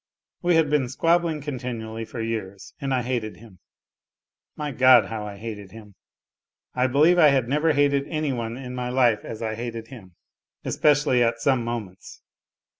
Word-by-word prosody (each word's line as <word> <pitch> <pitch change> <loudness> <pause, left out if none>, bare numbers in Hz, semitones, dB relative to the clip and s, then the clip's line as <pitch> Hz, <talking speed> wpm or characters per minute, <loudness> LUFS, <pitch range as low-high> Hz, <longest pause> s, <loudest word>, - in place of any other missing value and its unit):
We 175 -1 +2
had 160 -3 +2
been 140 -5 +1
squabbling 165 +2 +1
continually 120 -5 -5
for 115 - -7
years, 100 -4 -5
and 135 -1 -2
I 130 -2 +1
hated 120 -3 -3
him. 105 -6 -16 1.0
My 150 -1 -4
God, 130 -2 +6
how 110 -2 -5
I 100 -1 -8
hated 105 -3 -8
him! 105 -2 -13 0.8
I 125 +1 +1
believe 155 +7 +4
I 155 - +8
had 135 -4 +1
never 150 +4 +2
hated 140 -1 +2
any 155 -3 -2
one 115 -1 -4
in 125 -1 -7
my 125 -1 -3
life 120 -4 +2
as 115 0 -7
I 110 -1 -2
hated 115 0 -6
him, 95 -9 -13 0.5
especially 145 -4 +2
at 115 -1 +1
some 130 0 +1
moments. 110 -6 -7
125 Hz, 170 wpm, -24 LUFS, 115-140 Hz, 1.0 s, I